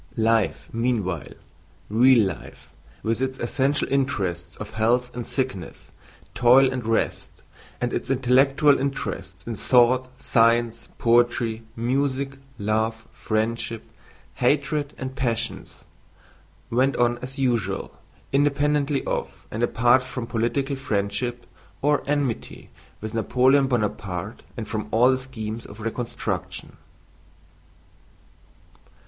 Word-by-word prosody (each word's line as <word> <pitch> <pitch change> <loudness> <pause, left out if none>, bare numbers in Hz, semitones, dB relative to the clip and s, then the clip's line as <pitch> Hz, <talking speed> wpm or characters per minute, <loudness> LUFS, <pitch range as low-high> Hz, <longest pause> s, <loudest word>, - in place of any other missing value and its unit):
Life 115 -1 +1
meanwhile—real 100 - +1
life, - - -15 0.3
with 115 +2 0
its 130 0 -1
essential 135 +4 0
interests 120 -11 -1
of - - -8
health 120 +3 +1
and 120 - -3
sickness, 130 - -4 0.4
toil 130 +2 +5
and 125 -1 -3
rest, 115 0 -1 0.4
and 120 0 -1
its - - -3
intellectual 135 +2 +4
interests 95 -9 -4
in 115 - -3
thought, 125 +3 +3
science, 115 0 +2
poetry, 120 -1 +2
music, 135 +3 -1 0.2
love, 110 +2 -1
friendship, 115 +1 -2 0.5
hatred, 145 +3 0
and 130 0 -5
passions—went 130 +1 -3
on 120 0 +2
as 130 +3 -7
usual, 115 -8 0 0.4
independently 145 0 +2
of - - -4
and 110 - -3
apart 120 +2 +4
from 125 -2 -5
political 125 +5 -1
friendship 120 0 -2 0.4
or 145 0 +3
enmity 140 -5 -2 0.3
with 110 +1 -5
Napoleon 130 +4 +3
Bonaparte 105 -4 -2 0.2
and 110 -2 -4
from 110 -1 -3
all 120 +4 +5
the 130 - +2
schemes 115 -4 -6
of 105 - -12
reconstruction. 115 +2 -4
120 Hz, 105 wpm, -24 LUFS, 110-130 Hz, 0.5 s, toil